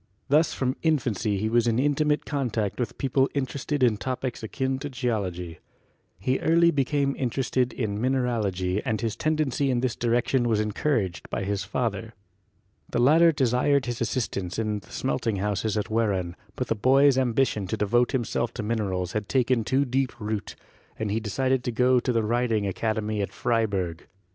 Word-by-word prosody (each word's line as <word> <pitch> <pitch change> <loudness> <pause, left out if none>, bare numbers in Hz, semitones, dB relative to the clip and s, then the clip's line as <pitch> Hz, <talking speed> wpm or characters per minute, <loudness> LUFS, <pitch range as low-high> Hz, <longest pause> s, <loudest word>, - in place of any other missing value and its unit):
Thus 150 +3 +4
from 130 0 -1
infancy 120 - 0
he 105 +3 -1
was 120 +1 +2
in 115 -1 +2
intimate 150 +2 +1
con 140 -4 -1
tact 110 -1 -2
with 120 -4 -3
people 135 0 +1
interested 140 +1 -1
in 115 -4 +4
topics 130 +1 -3
akin 130 +4 -2
to 145 +1 -5
Geology. 100 - -3 0.6
He 130 +8 0
early 170 +1 +4
became 140 -1 0
interested 125 0 0
in 105 -3 -3
mineralogy 110 -7 0
and 110 -1 -1
his 115 -1 -2
tendency 150 -3 0
in 125 -2 +1
this 125 -3 -1
direction 120 +1 +1
was 110 -2 +2
encouraged 105 - -1
by - - -2
his 100 0 -2
father. 115 0 -3 0.7
The - - -2
latter 160 +7 +6
desired 135 0 +2
his 120 -1 -4
assistance 100 -6 -2
in 110 -2 -1
the - - -19
smelting 100 - -1
houses 105 +2 -1
at 105 - -2
Wehran, 100 -6 0 0.2
but 130 - -2
the - - 0
boy's 135 +5 +4
ambition 125 -5 +1
to 110 - -2
devote 120 +4 +2
himself 120 -1 -1
to - - -3
minerals 100 -5 -1
had 105 0 -3
taken 125 -2 +2
too 135 +5 +1
deep 130 -1 -1
root, 105 -1 -4 0.4
and 110 -2 -2
he 110 - +1
decided 130 +4 0
to 125 - 0
go 125 +2 +3
to 125 - -1
the 115 -2 +1
Riding 115 -1 +1
Academy 110 +1 -1
at 100 - -3
Freiburg. 100 -8 -1
120 Hz, 175 wpm, -26 LUFS, 105-130 Hz, 0.7 s, latter